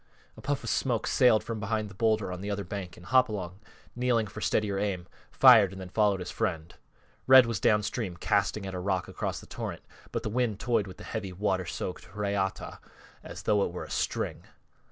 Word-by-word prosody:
A - - -12
puff 140 -1 -2
of 115 - -3
smoke 120 -4 0
sailed 125 -4 +4
from 115 -2 -4
behind 110 +1 -1
the 100 - -11
bowlder 110 -2 +1
on 90 0 -6
the 100 - -4
other 100 0 -2
bank 95 -1 -6
and 90 - -14
Hopalong, 100 -6 +1 0.4
kneeling 120 -2 +1
for 105 +1 -9
steadier 100 -3 0
aim, 95 -4 -2 0.2
fired 115 -8 +7
and 95 - -9
then 95 -1 -7
followed 100 -2 +2
his 90 - -5
friend. 85 -2 -2 0.5
Red 130 -1 +9
was 115 -4 -2
downstream 105 -2 0
casting 100 +3 0
at 95 - -5
a 90 - -3
rock 95 -1 -1
across - - -4
the - - -13
torrent - - -6 0.3
but - - -3
the - - -2
wind 115 -2 0
toyed 115 -4 +1
with 95 - -10
the - - -11
heavy, 95 -1 -5
water 95 -1 -1
soaked 90 +1 -5
reata 100 -2 -2 0.4
as - - -9
though 105 -1 +3
it - - -2
were 90 - -6
a - - -10
string. - - -2
100 Hz, 205 wpm, -29 LUFS, 95-110 Hz, 0.5 s, Red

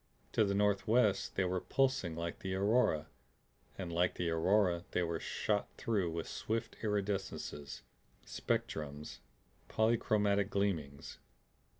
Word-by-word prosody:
To 110 - +3
the 100 -1 +1
northwest 105 +1 +2
they 95 - +2
were 90 0 -1
pulsing 130 -11 +1
like 85 0 -4
the 95 -1 -3
aurora, 100 -6 +2 0.7
and 90 -3 -5
like 90 +1 +2
the 85 -2 -1
aurora 90 +1 +3
they 90 - +2
were 85 -1 -2
shot 105 -1 -1
through 100 -7 0
with 85 0 -4
swift 115 +1 -3
iridescences, 100 -8 -3 0.4
spectrums, 75 -1 -3 0.5
polychromatic 105 -3 +2
gleamings. 85 -10 -2
95 Hz, 115 wpm, -34 LUFS, 85-105 Hz, 0.7 s, To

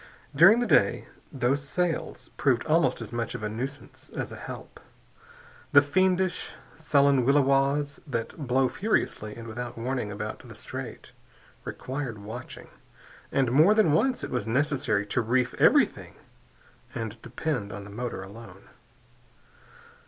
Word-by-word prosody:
During 215 +8 +7
the - - +1
day, - - +3 0.3
those 135 +1 0
sails 170 +3 -2
proved 130 -4 +1
almost 165 +2 +2
as - - -7
much 120 0 -3
of - - -6
a 105 - -1
nuisance 130 +6 -7
as - - -4
a - - -7
help. - - -9 0.9
The 145 - +9
fiendish, 185 +4 +1 0.2
sullen 140 -3 +3
williwaws 140 +1 +2
that 115 -5 -3
blow 130 +1 +3
furiously 125 - -1
and 115 0 -9
without 120 +2 -6
warning 120 -2 -2
about 100 - -5
the - - -12
Strait - - -8 0.5
required 130 -4 -5
watching, 105 +2 -9 0.6
and 130 -3 +1
more 160 - +6
than 215 -8 +4
once 255 - +2
it - - -5
was 120 -4 -2
necessary 130 -5 +1
to 115 +4 0
reef 125 +2 +1
everything - - +3 0.8
and 115 0 -5
depend 125 -4 -3
on 100 +1 -7
the 100 - -11
motor 115 -3 -4
alone. 100 -1 -12
130 Hz, 135 wpm, -27 LUFS, 115-145 Hz, 0.9 s, The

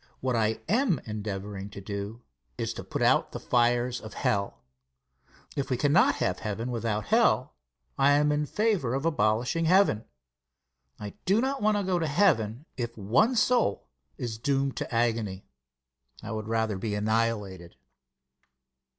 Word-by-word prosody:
What 130 -1 -1
I 110 -1 0
am 220 - +2
endeavoring 100 -2 -5
to 100 - -9
do 100 +3 -6 0.3
is - - -2
to - - -7
put - - -3
out - - +3
the - - -4
fires 120 0 +1
of 110 - -10
hell. 100 -11 -1 0.9
If 140 - -2
we 130 - 0
cannot 170 - +4
have - - -1
heaven 115 +3 -3
without 110 -3 -2
hell, - - +3 0.5
I 140 +1 +5
am 150 +1 +3
in 150 0 0
favor 200 - 0
of 135 +3 -2
abolishing 125 +2 +1
heaven. 175 - +3 0.9
I 105 -1 -6
do 195 +4 +3
not 270 +3 -1
want 210 0 +3
to 205 - -1
go 185 -2 0
to 160 - -1
heaven 140 - +2
if 120 -2 -4
one 120 - +2
soul 235 - +1 0.3
is 110 -3 -4
doomed 135 +1 0
to - - -4
agony. 115 -5 -1 0.8
I 110 - -6
would 110 -1 -4
rather 110 -3 0
be 105 +1 -2
annihilated. 105 -5 -1
115 Hz, 150 wpm, -28 LUFS, 105-150 Hz, 0.9 s, I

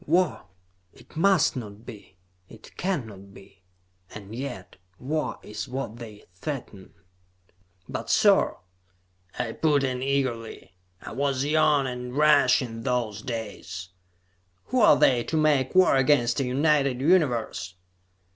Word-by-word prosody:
"War! 180 +4 +1 0.5
It - - -19
must 185 -1 +3
not 110 -2 -8
be. 105 -5 -12 0.3
It 110 - -15
cannot 110 - -4
be! 95 0 -17 0.5
And 105 0 -10
yet, 120 -8 -7 0.2
war 150 +6 -3
is 105 - -6
what 125 -3 -5
they 110 -3 -11
threaten." 105 - -7 0.9
"But, - - -6
sir!" - - +3 0.8
I 125 - -2
put 150 -3 +1
in 130 -2 -2
eagerly. 130 -8 -3 0.3
I - - -8
was 135 +1 -1
young 150 -2 +3
and 125 0 -5
rash 150 -4 +4
in 115 -2 -7
those 115 -5 -2
days. 105 -8 -6 0.8
"Who 255 - +1
are 210 - +6
they, 120 -3 +3
to 160 - -2
make 150 -2 +2
war 185 -5 +5
against 130 -2 +2
a 135 - 0
united 140 0 +1
Universe?" 125 - +1
130 Hz, 125 wpm, -25 LUFS, 110-145 Hz, 0.9 s, are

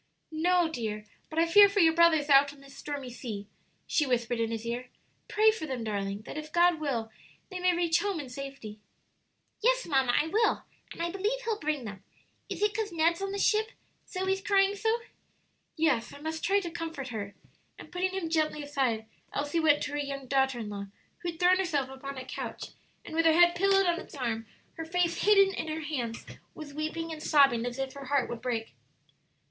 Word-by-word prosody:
"No, 350 +2 +2
dear; 215 -8 -4 0.2
but 315 - -8
I 330 - +5
fear 405 +4 +8
for 405 +1 0
your 325 -3 +6
brothers 325 -3 +4
out 280 0 +6
on 285 - -16
this 275 0 -15
stormy 280 -4 -6
sea," 225 -4 -6 0.4
she 300 - +1
whispered 240 -1 0
in 225 -1 0
his 225 0 -4
ear. 245 +2 -4 0.4
"Pray 435 +1 +4
for 430 -8 -5
them, 255 -4 -3
darling, 200 -1 -3
that 295 - -6
if 305 0 -9
God 345 -1 +4
will, 240 -7 -2 0.4
they 370 - -5
may 360 -1 +3
reach 340 0 +2
home 400 -2 -1
in 285 - -6
safety." 250 -5 -8 0.8
"Yes, - - +3
mamma, 265 -5 +2
I - - +2
will; 435 +8 +1 0.3
and 335 - -5
I 340 - -1
believe 415 +7 -1
He'll 445 -2 -1
bring 300 -3 -1
them. 200 -2 -8 0.5
Is - - -3
it 420 0 +2
'cause 425 -2 -2
Ned's 335 +2 +2
in 390 0 -2
the 400 - -3
ship 430 +3 +2 0.4
Zoe's 380 0 -1
crying 390 0 +3
so?" 450 +3 0 0.7
"Yes; 295 -8 +1
I - - -11
must 315 +1 -5
try 400 +1 +3
to 345 -3 -5
comfort 325 -5 -5
her." 205 -3 -5 0.4
And - - -12
putting 365 +1 0
him 375 -3 -3
gently 310 -2 0
aside, 260 -6 -1 0.3
Elsie 290 +3 -1
went 300 -2 +4
to 290 - -4
her 290 - -2
young 275 -1 -4
daughter 265 -1 +1
in 220 -3 -5
law, 200 -1 -6 0.3
who 350 - -3
had 330 -1 -8
thrown 360 +1 +5
herself 300 -8 0
upon 270 +1 -7
a 255 - -6
couch, - - -6 0.3
and - - -9
with 330 0 +4
her 320 - +6
head 345 0 +7
pillowed 390 +2 +3
on 345 -1 +1
its - - -11
arm, 230 -4 -3 0.3
her 325 - -4
face 340 +1 0
hidden 395 -2 +6
in 320 - -4
her 315 +1 -3
hands, 255 -7 -4 0.3
was 300 -2 -9
weeping 315 +2 -3
and 310 -1 -7
sobbing 275 -7 +4
as 245 +1 -5
if 270 -1 -3
her 280 -1 -9
heart 275 -1 +1
would 235 -1 -6
break. 235 -3 -3
310 Hz, 210 wpm, -29 LUFS, 260-355 Hz, 0.8 s, fear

